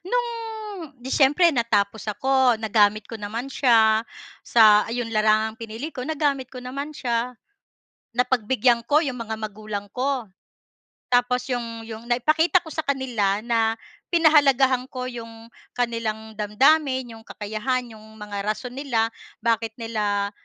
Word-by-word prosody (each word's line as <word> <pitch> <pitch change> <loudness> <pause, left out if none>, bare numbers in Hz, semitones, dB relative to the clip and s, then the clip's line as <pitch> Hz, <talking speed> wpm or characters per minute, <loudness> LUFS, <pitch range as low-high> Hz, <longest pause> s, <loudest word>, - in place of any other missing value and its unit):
No'ng 445 - -4
'di 260 +2 -7
siyempre 295 +5 +5
natapos 220 -3 0
ako. 260 +2 +2
Nagamit 215 -1 +2
ko - - -9
naman 220 +4 -4
siya 225 -5 +4 0.4
sa 215 -3 +6
ayun, 235 0 -3
larangang 215 +1 +2
pinili 230 +7 -6
ko. 250 - -5
Nagamit 280 -3 -1
ko 255 - -9
naman 275 +4 -5
siya. 245 -3 -2 0.8
Napagbigyan 245 -1 +2
ko 300 +1 +5
'yong 260 -3 -3
mga 225 -1 -4
magulang 215 -1 -6
ko. 260 -2 -1 0.9
Tapos 245 0 +3
'yong 230 -2 -4
'yong 225 0 -8
naipakita 310 +9 +3
ko 320 - -9
sa 315 - -2
kanila 235 -8 0
na 225 -2 +1 0.4
pinahalagahan 275 -6 +4
ko 255 -1 -5
'yong 230 -1 -10 0.3
kanilang 220 -2 -2
damdamin, 260 +3 +2
'yong 225 - -15
kakayahan, 230 +3 -3
'yong 220 0 -15
mga 210 -1 -6
rason 240 +4 -3
nila, 250 -5 0 0.4
bakit 225 -1 0
nila 210 -3 -1
235 Hz, 130 wpm, -24 LUFS, 220-265 Hz, 0.9 s, sa